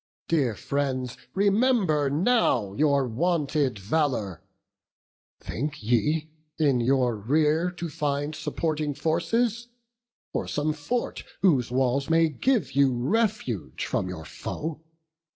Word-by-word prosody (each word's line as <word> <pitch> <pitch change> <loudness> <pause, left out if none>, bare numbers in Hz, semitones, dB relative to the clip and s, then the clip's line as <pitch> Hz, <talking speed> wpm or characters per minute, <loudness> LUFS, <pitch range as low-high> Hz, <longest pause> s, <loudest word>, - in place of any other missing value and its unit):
dear 135 -9 +1
friends, 130 -2 -2 0.2
remember 200 - +3
now 145 - +2
Your 140 +1 +2
wonted 145 -1 0
valour! 105 - -1 1.0
think 145 -1 -4
ye 150 +8 +1 0.3
in 140 -5 +3
your 125 -1 +2
rear 150 - +2
To 175 -1 -5
find 145 0 -2
supporting 155 -1 -2
forces, 230 - 0 0.7
or - - -2
some 150 +1 0
fort 160 +12 -3 0.2
Whose 140 - +4
walls 130 +3 +1
may 165 0 +4
give 240 - 0
you 140 -1 +4
refuge 190 - -1
from 90 - -1
your 80 -4 -7
foe? 150 - -5
145 Hz, 110 wpm, -26 LUFS, 130-165 Hz, 1.0 s, Whose